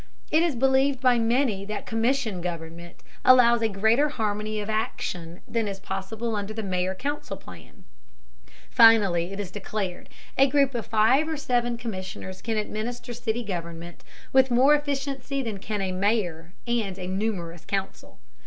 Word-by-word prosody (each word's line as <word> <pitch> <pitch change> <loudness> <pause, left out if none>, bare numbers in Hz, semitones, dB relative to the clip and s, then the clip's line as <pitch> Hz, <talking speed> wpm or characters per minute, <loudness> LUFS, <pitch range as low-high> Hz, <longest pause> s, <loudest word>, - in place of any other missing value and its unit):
It 315 - +4
is 335 -5 +1
believed 265 +2 +3
by 250 -2 +4
many 230 -3 +1
that 210 +1 -5
commission 225 -4 0
government 170 0 -7 0.2
allows 235 -2 +6
a 225 - +2
greater 220 +9 +3
harmony 215 -4 -2
of 205 - -4
action 180 -5 -3
than 230 -2 -1
is 195 -1 -5
possible 210 +4 -4
under 205 +1 -4
the 220 - -3
mayor 185 -1 -1
council 280 -4 -4
plan. 90 - -14 0.9
Finally, 205 -7 +5
it 195 - -6
is 195 -3 -4
declared, 195 -2 -4 0.3
a 270 0 +6
group 275 -1 +3
of 235 -2 -4
five 240 +8 +3
or 320 - -2
seven 240 -3 0
commissioners 190 -4 -6
can 225 -2 -2
administer 235 +3 -4
city 235 0 -2
government 170 -3 -6 0.3
with 265 0 +5
more 255 +4 +5
efficiency 275 -2 -2
than 215 -4 -4
can 210 +1 -3
a 190 - -1
mayor 185 -4 -1
and 225 -6 -1
a 185 - -5
numerous 185 -4 -3
council. 195 - -4
220 Hz, 155 wpm, -26 LUFS, 190-245 Hz, 0.9 s, allows